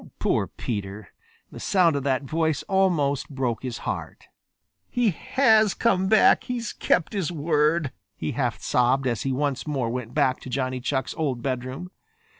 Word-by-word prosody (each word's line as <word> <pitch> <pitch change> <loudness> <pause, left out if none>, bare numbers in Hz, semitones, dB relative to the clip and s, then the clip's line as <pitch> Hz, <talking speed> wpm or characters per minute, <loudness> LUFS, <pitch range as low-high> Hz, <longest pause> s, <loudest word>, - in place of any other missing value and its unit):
Poor - - +1
Peter! 100 -3 -5 0.4
The - - -9
sound 175 -5 +3
of 140 - 0
that 135 0 +1
voice 160 0 0
almost 165 -8 +1
broke 130 -5 -2
his 125 -3 -4
heart. - - -5 0.6
"He 240 -4 +2
has 220 - +3
come 190 -5 +2
back. 215 +1 +5
He's 240 -3 -3
kept 175 - +1
his 190 -5 -1
word," 155 -1 +1 0.2
he 75 - -3
half - - -1
sobbed 125 +2 +2
as 120 -4 0
he 135 - -1
once 140 +2 -1
more 130 -6 -1
went 125 -1 -5
back 135 -4 +2
to - - -9
Johnny 130 0 -2
Chuck's 135 +2 -2
old 130 -6 -1
bedroom. 130 +7 -4
140 Hz, 160 wpm, -25 LUFS, 130-175 Hz, 0.6 s, back